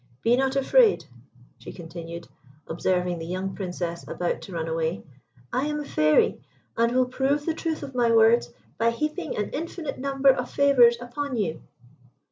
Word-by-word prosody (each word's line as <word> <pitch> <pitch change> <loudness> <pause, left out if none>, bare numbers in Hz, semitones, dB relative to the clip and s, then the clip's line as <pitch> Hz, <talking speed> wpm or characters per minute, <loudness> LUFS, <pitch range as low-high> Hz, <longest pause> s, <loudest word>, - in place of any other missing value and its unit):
Be 235 - +4
not 265 +1 0
afraid," 420 - +4 0.5
she - - -9
continued, 170 0 -9 0.4
observing 180 +1 -1
the 165 - -6
young 185 +2 -3
Princess 175 -3 -4
about 175 -1 -2
to - - -10
run 165 -2 -3
away. 160 +1 -2 0.5
"I 260 +4 0
am 300 0 -2
a 295 - -5
Fairy, 155 - +2 0.3
and 230 +1 +2
will 255 +1 +3
prove 275 +3 -1
the 325 - 0
truth 320 -1 -3
of 270 - -7
my 240 -2 +2
words 230 +1 +4 0.3
by 230 +1 +3
heaping 305 +9 -3
an 210 - -2
infinite 320 -1 -5
number 275 0 +2
of 250 -2 +2
favours 250 -4 +5
upon 250 +2 -4
you." 175 -7 -2
235 Hz, 165 wpm, -25 LUFS, 180-275 Hz, 0.5 s, favours